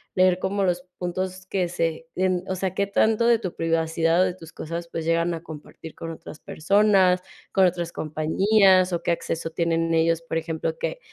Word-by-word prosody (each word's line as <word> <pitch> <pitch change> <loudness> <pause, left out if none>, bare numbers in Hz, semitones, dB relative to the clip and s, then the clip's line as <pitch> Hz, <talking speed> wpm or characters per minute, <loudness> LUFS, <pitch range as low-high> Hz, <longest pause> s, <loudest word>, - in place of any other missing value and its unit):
leer 185 -1 +4
como 195 +1 -1
los 180 -1 0 0.2
puntos 185 +1 -4
que 185 -3 0
se 165 -2 -2
en 185 -1 0
o 190 - -1
sea, 185 0 -2
qué 200 - +1
tanto 220 +3 +2
de 235 -2 +4
tu 185 -6 -5
privacidad 165 +1 +1
o - - +5
de 180 -1 -2
tus 165 -3 -13
cosas, 170 +1 -5
pues 165 -1 -5
llegan 165 +1 +1
a 165 - -5
compartir 155 0 -11
con 165 - -6
otras 160 -1 -10
personas, 190 +1 +3 0.3
con 190 -2 +4
otras 175 -1 -3
compañías, 185 +4 +3
o 170 - -1
qué - - -2
acceso 165 -1 -3
tienen 165 0 0
ellos. 165 0 +2
Por 165 0 -3
ejemplo, 160 0 -3
que - - -3
175 Hz, 195 wpm, -24 LUFS, 165-185 Hz, 0.3 s, o